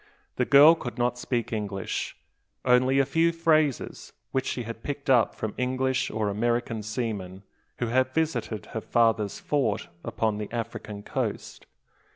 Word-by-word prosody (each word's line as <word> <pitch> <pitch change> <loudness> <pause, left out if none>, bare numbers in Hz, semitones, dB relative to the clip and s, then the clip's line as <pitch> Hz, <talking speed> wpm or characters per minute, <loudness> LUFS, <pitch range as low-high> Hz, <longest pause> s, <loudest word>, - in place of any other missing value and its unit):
The - - +2
girl 145 +4 +8
could 120 -7 -6
not 120 0 0
speak 120 -2 -2
English, 100 -3 -3 0.5
only 130 +1 +4
a 135 - +4
few 165 +4 +2
phrases 155 -4 0 0.2
which 130 -1 -1
she 125 - -2
had 115 0 -7
picked 140 0 -2
up 120 -4 +4
from 110 - -4
English 130 +1 0
or 110 -1 -1
American 115 +2 -1
seamen, 105 -4 -4 0.3
who 120 - -1
had 130 +2 +1
visited 130 -8 -1
her 110 - -2
father's 115 -4 +1
fort 135 -9 -1
upon 110 -2 -1
the 105 - -5
African 115 -3 -5
coast. - - -4
120 Hz, 150 wpm, -27 LUFS, 110-130 Hz, 0.5 s, girl